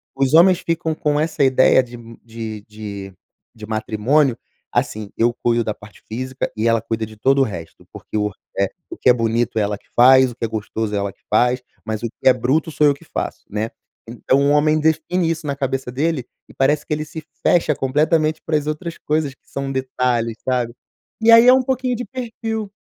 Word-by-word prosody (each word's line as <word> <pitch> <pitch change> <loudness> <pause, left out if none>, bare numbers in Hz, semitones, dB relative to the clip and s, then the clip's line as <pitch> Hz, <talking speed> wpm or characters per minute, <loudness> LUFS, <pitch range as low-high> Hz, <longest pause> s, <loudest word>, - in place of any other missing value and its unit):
Os 135 0 +1
homens 175 +2 +6
ficam 165 -2 -1
com 150 -1 0
essa 155 -2 0
ideia 130 0 +5
de 120 -1 -11 0.3
de 110 -2 -7
de 100 -3 -8 0.4
de 110 - -9
matrimônio, 115 +5 +1 0.3
assim: 120 -4 -2
"Eu 120 +1 +2
cuido 120 0 +2
da 110 - -2
parte 105 0 -16
física 130 +4 -4
e 110 +2 +1
ela 115 -1 +3
cuida 115 0 -3
de 110 0 -13
todo 135 +6 +2
o - - +5
resto, 85 -7 -8
porque - - -6
o 105 0 0 0.3
eh, 100 - +2 0.3
que - - +4
é - - +8
bonito 115 -1 0
ela 105 -1 0
que - - -32
faz, 130 +1 +7
o - - -12
que 120 - -8
é - - +1
gostoso 110 0 -3
ela 100 -1 -2
que - - -40
faz, 125 +3 +2 0.2
mas 110 0 -4
o - - 0
que - - +1
é 130 - +8
bruto 130 +7 0
sou 150 -1 +2
eu 145 - +5
que 140 - -16
faço, - - -5
né?" 110 +2 -2 0.4
Então 120 +3 0
o 140 0 +3
homem 155 +1 +3
define 160 +3 +1
isso 165 -2 -4
na 140 - -1
cabeça 135 -2 -2
dele 145 0 -1 0.2
e - - -16
parece 145 +2 +1
que - - -2
ele 155 0 -2
se 155 +1 -8 0.2
fecha 165 -3 +3
completamente 155 +4 +1
para 160 - 0
as 150 0 -4
outras 160 +2 -4
coisas 150 -2 -1
que - - -37
são 140 0 -4
detalhes, 125 -3 -1
sabe? 125 -2 0 0.5
E 225 +1 +6
aí, 230 +1 +8
é 250 - +9
um 260 0 +3
pouquinho 255 -1 -1
de 245 +1 -5
perfil 225 -3 -5
130 Hz, 210 wpm, -20 LUFS, 115-155 Hz, 0.5 s, é